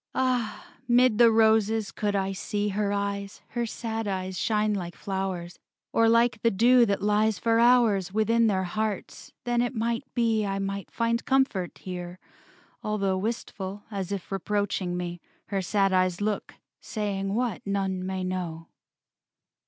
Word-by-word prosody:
Ah, 250 Hz, -4 st, -1 dB
'mid 245 Hz, -2 st, +4 dB
the 235 Hz, -1 st, +8 dB
roses 220 Hz, -1 st, +3 dB
could 205 Hz, -1 st, -1 dB
I 195 Hz, 0 st, 0 dB
see 205 Hz, +2 st, -2 dB
Her 200 Hz, 0 st, 0 dB
eyes, 200 Hz, 0 st, -3 dB
her 240 Hz, -1 st, -2 dB
sad 225 Hz, -1 st, -4 dB
eyes, 190 Hz, -1 st, -3 dB
shine 210 Hz, +2 st, +1 dB
like 175 Hz, -3 st, -4 dB
flowers, 190 Hz, -3 st, -4 dB, 0.3 s
Or 230 Hz, 0 st, +4 dB
like 230 Hz, -1 st, +3 dB
the 230 Hz, -, +4 dB
dew 235 Hz, +4 st, +5 dB
that 200 Hz, -1 st, -1 dB
lies 210 Hz, 0 st, +2 dB
for 230 Hz, +4 st, +2 dB
hours 230 Hz, -6 st, +4 dB
Within 225 Hz, +2 st, +3 dB
their 190 Hz, -3 st, +1 dB
hearts, 210 Hz, +2 st, -4 dB
then 240 Hz, -1 st, +1 dB
it 245 Hz, +1 st, -1 dB
might 235 Hz, +3 st, -2 dB
be 225 Hz, -3 st, +2 dB
I 195 Hz, -1 st, -1 dB
might 195 Hz, 0 st, -3 dB
find 230 Hz, 0 st, 0 dB
comfort 265 Hz, -10 st, +1 dB
here, 180 Hz, -1 st, -7 dB, 0.6 s
although 200 Hz, -3 st, 0 dB
Wistful, 200 Hz, -1 st, -4 dB
as 195 Hz, -2 st, -4 dB
if 200 Hz, -2 st, -5 dB
reproaching 195 Hz, -2 st, -1 dB
me, 175 Hz, -1 st, -5 dB, 0.3 s
Her 195 Hz, -1 st, 0 dB
sad 195 Hz, +1 st, +1 dB
eyes 185 Hz, -1 st, +2 dB
look, 205 Hz, 0 st, -2 dB, 0.2 s
saying 200 Hz, -2 st, -3 dB
what 235 Hz, -5 st, -1 dB
none 195 Hz, -2 st, -1 dB
may 190 Hz, 0 st, -3 dB
know. 175 Hz, -3 st, -4 dB
205 Hz, 150 wpm, -27 LUFS, 190-225 Hz, 0.6 s, the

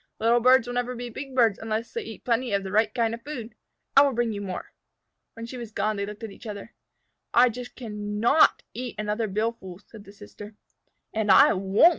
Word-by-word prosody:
"Little 230 Hz, +2 st, +3 dB
birds 255 Hz, +1 st, +5 dB
will 245 Hz, -, -5 dB
never 245 Hz, 0 st, -2 dB
be 245 Hz, 0 st, -6 dB
big 270 Hz, +2 st, -8 dB
birds 230 Hz, -5 st, +3 dB
unless 225 Hz, +1 st, -3 dB
they 465 Hz, -, -2 dB
eat 225 Hz, -, -10 dB
plenty 240 Hz, -1 st, 0 dB
of 200 Hz, -1 st, +1 dB
the 190 Hz, -, -6 dB
right 215 Hz, +2 st, +2 dB
kind 230 Hz, -2 st, 0 dB
of 230 Hz, -, -6 dB
food. 240 Hz, -4 st, -7 dB, 0.4 s
I 275 Hz, -, +9 dB
will 280 Hz, -1 st, +3 dB
bring 235 Hz, -1 st, 0 dB
you 205 Hz, -, -5 dB
more." 185 Hz, -3 st, -6 dB, 0.6 s
When 230 Hz, -, -8 dB
she 250 Hz, +2 st, -8 dB
was 235 Hz, -2 st, -7 dB
gone 215 Hz, 0 st, -1 dB
they 200 Hz, 0 st, -3 dB
looked 210 Hz, +2 st, -9 dB
at 220 Hz, -, -5 dB
each 230 Hz, -, -12 dB
other. 210 Hz, +2 st, -8 dB, 0.6 s
"I 245 Hz, +1 st, +7 dB
just 245 Hz, +1 st, -8 dB
can 210 Hz, -3 st, -5 dB
not 260 Hz, +8 st, +4 dB
eat 245 Hz, 0 st, -6 dB
another 210 Hz, +1 st, -1 dB
billful," 200 Hz, -3 st, -3 dB
said 215 Hz, -3 st, -13 dB
the 200 Hz, -, -13 dB
sister. 205 Hz, +1 st, -12 dB, 0.6 s
"And 220 Hz, -1 st, -1 dB
I 190 Hz, -, +7 dB
won't!" 195 Hz, -, +5 dB
225 Hz, 220 wpm, -26 LUFS, 210-245 Hz, 0.6 s, I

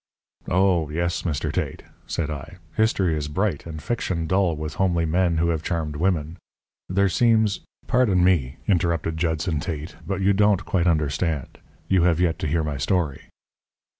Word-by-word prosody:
"Oh, 90 Hz, -4 st, +2 dB
yes, 85 Hz, +3 st, -1 dB
Mr. 80 Hz, -6 st, -2 dB
Tate," -, -, -3 dB, 0.2 s
said 80 Hz, -2 st, -2 dB
I. 75 Hz, +4 st, -7 dB, 0.2 s
"History 100 Hz, -6 st, +2 dB
is 75 Hz, -1 st, -3 dB
bright 85 Hz, 0 st, -1 dB
and 80 Hz, -1 st, -6 dB
fiction 85 Hz, -2 st, -2 dB
dull 95 Hz, -1 st, +2 dB
with 75 Hz, 0 st, -5 dB
homely 85 Hz, -3 st, +2 dB
men 85 Hz, +1 st, +1 dB
who 85 Hz, +1 st, +2 dB
have 80 Hz, -2 st, 0 dB
charmed 80 Hz, -3 st, -2 dB
women. 80 Hz, -1 st, 0 dB, 0.5 s
There 100 Hz, +2 st, +3 dB
seems 110 Hz, 0 st, +3 dB
" -, -, -37 dB
"Pardon 115 Hz, -9 st, +3 dB
me," 80 Hz, -7 st, +2 dB
interrupted 85 Hz, -4 st, +1 dB
Judson 80 Hz, -1 st, 0 dB
Tate, 80 Hz, 0 st, -5 dB
"but 100 Hz, -1 st, -2 dB
you 100 Hz, +1 st, +3 dB
don't 105 Hz, 0 st, +3 dB
quite 90 Hz, -2 st, +1 dB
understand. 75 Hz, -2 st, -1 dB, 0.3 s
You 95 Hz, -2 st, +3 dB
have 85 Hz, -1 st, +3 dB
yet 85 Hz, -2 st, +1 dB
to -, -, -2 dB
hear 80 Hz, +2 st, +1 dB
my 75 Hz, -2 st, -3 dB
story. 75 Hz, 0 st, -1 dB
85 Hz, 165 wpm, -24 LUFS, 80-95 Hz, 0.5 s, There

